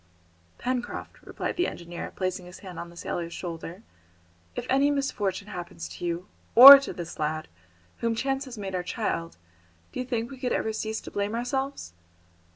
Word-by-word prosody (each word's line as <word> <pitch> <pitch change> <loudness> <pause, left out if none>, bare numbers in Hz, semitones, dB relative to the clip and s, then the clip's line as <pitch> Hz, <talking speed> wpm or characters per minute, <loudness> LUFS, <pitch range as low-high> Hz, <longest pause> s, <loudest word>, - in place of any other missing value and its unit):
"Pencroft," 250 -1 -4
replied - - -4
the 355 - +2
engineer, 170 0 -7
placing 185 -1 -3
his 180 - -11
hand 180 -2 -8
on 170 - -6
the 170 - -15
sailor's 170 -1 -4
shoulder, 170 +3 -7 0.7
"if - - -4
any 275 +2 +3
misfortune 210 -9 -1
happens 170 - -6
to 90 - -10
you, 175 +2 -2 0.3
or 275 +3 +14
to 275 - -5
this 170 -2 -7
lad, 155 +1 -2 0.5
whom 230 -1 0
chance 270 +3 -1
has 250 -3 -9
made 195 -2 -5
our 180 - 0
child, 175 -3 -3 0.5
do - - -6
you 255 - -2
think 235 -1 -2
we 265 - -9
could 250 -1 -1
ever 220 - -1
cease 220 0 -3
to - - -10
blame 205 +2 -2
ourselves?" 265 - -3
205 Hz, 175 wpm, -27 LUFS, 175-255 Hz, 0.7 s, or